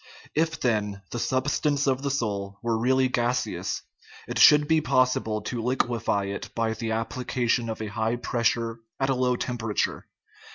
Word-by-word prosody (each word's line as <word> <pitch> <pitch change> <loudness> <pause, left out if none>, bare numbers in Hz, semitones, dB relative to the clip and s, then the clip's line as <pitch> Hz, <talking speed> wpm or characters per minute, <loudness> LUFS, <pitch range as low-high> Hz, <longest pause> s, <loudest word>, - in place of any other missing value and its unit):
If, 165 +1 0
then, 105 -5 0
the 120 - -3
substance 140 +3 +1
of 135 -1 +1
the 140 - -1
soul 100 -7 -2
were 115 -1 +1
really 130 +3 +3
gaseous, 125 0 -1 0.4
it - - -3
should 150 -1 +7
be 160 0 +3
possible 125 -6 +1
to 120 -2 -3
liquefy 120 -4 0
it 100 0 -5
by 115 -1 0
the 115 0 -4
application 120 +1 -1
of 110 0 -4
a 105 -1 -6
high 110 +1 0
pressure 115 -1 0 0.2
at 135 0 +1
a - - +3
low 125 -1 +1
tem 120 0 -3
perature. 110 -2 -1
120 Hz, 165 wpm, -26 LUFS, 110-130 Hz, 0.4 s, should